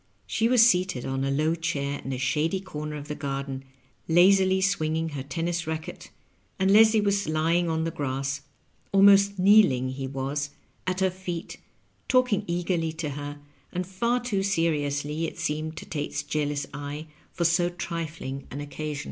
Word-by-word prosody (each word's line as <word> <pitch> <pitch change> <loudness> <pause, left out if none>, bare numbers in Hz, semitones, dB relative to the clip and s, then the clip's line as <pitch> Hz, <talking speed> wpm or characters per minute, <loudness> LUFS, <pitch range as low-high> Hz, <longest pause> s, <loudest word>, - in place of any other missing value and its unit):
She 225 - +1
was 240 -1 +6
seated 180 - +1
on 135 0 -2
a 135 - 0
low 155 +4 +1
chair 145 -4 -2
in 135 - -4
a 130 - -2
shady 155 +7 0
comer 150 -5 -6
of 145 -1 -7
the 150 - -3
garden, 135 -2 -4 0.4
lazily 190 +2 +5
swinging 165 -4 0
her 145 -3 -5
tennis^ 165 +5 -3
racket, 160 0 -5 0.5
and 190 +1 +2
Leslie 220 +1 +7
was 200 -3 +1
lying 165 +2 +1
on 160 0 0
the 165 - -1
grass 135 -1 -2 0.3
— - - -39
^almost 200 0 +6
kneel 200 0 +6
ing, 130 0 -1
he 135 +1 -4
was 140 +2 -3 0.2
— - - -38
^at 185 +1 -1
her 190 -1 +3
feet, 180 -2 -6 0.5
talking 250 -6 +3
eagerly 170 -1 0
to 160 -2 -4
her, 145 +1 -6 0.3
and 180 0 -2
far 235 +7 0
too 230 -6 -1
seriously, 155 -4 0
it - - -9
seemed 155 -1 -3
to - - -7
Tate's 145 -1 -3
jealous 145 -1 -1
eye, 145 +2 -5 0.3
for 175 - -1
so 170 +1 +3
tri 170 -2 -4
fling 140 -3 -7
an 140 - -6
occasion. 145 0 -5
160 Hz, 175 wpm, -26 LUFS, 145-185 Hz, 0.5 s, Leslie